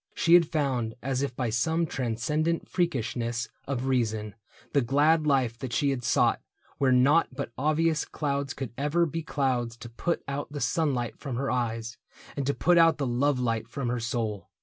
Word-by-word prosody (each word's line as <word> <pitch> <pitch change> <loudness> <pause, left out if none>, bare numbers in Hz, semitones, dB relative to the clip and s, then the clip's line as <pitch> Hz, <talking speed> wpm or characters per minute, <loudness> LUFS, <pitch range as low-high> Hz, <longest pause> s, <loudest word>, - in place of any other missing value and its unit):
She 165 - +3
had 175 -2 +7
found, 135 -8 -1
As 135 0 -1
if 140 -3 -2
by 125 -3 -1
some 160 +9 +1
transcendent 150 +6 -1
freakishness 120 -8 -1 0.2
Of 130 -2 -2
reason, 110 -5 0 0.4
the 140 - +4
glad 150 +5 +3
life 130 -5 +1
that 125 -2 -5
she 140 -2 +2
had 125 -2 -3
sought - - +2 0.4
Where 135 -2 +3
naught 140 +6 +5
but 140 -3 -4
obvious 155 +2 +1
clouds 140 -2 -3
could 130 -4 -5
ever 150 +4 +2
be 165 +1 -3
clouds 125 -6 -1
to 120 - -9
put 165 +9 -2
out 140 +1 -4
the 145 - -5
sunlight 125 -2 -1
from 135 -4 -5
her 135 +3 -1
eyes, 115 -2 -2 0.4
And 140 -2 -2
to 140 - +1
put 175 0 +4
out 165 -1 +5
the 140 - -1
love 130 +2 +1
light 115 -3 -1
from 120 +1 -3
her 120 0 -1
soul. 110 -5 -3
135 Hz, 185 wpm, -27 LUFS, 120-150 Hz, 0.4 s, had